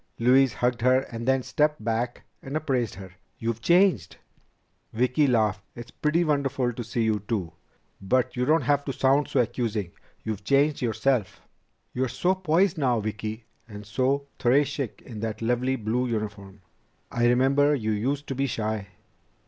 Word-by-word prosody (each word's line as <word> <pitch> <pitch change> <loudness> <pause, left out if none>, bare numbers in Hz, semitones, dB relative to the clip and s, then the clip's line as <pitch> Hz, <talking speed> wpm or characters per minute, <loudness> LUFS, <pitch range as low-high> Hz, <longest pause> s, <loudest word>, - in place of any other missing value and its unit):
Louise 130 +2 +4
hugged 120 -1 -1
her 130 +2 +4
and 115 +1 -6
then 130 -1 +2
stepped 150 -3 0
back 115 +2 -2 0.2
and 135 +3 -3
appraised 130 -8 -1
her. 95 -1 -10 0.3
"You've 115 0 -3
changed!" 170 - +3 0.8
Vicki 130 +5 +2
laughed. 110 -5 +1
"It's 120 0 -9
pretty 155 +3 +1
wonderful 135 -5 0
to 120 - -5
see 120 +1 -2
you, 110 -1 +1
too. 95 -8 -2 0.5
But 125 +6 +1
you 125 - 0
don't 155 +1 +3
have 145 +2 +2
to 135 - -3
sound 135 +3 +2
so 130 - +2
accusing. 110 -5 -2 0.3
You've 105 -2 -4
changed 140 +5 +2
yourself!" 120 -3 0 0.5
"You're 130 +1 0
so 175 +10 +1
poised 185 -1 +1
now, 125 -5 +2
Vicki, 110 +1 -5 0.2
and 105 -1 -9
so 130 +6 0
très 135 +5 +4
chic 140 -4 -5
in 115 -4 -8
that 110 0 -4
lovely 125 +3 0
blue 120 +2 -1
uniform. 105 -3 -5 0.5
I 120 0 +2
remember 135 +4 +3
you 110 -5 -2
used 135 +7 -1
to - - -1
be 135 +1 -1
shy." 110 -4 -3
125 Hz, 165 wpm, -26 LUFS, 110-140 Hz, 0.8 s, Louise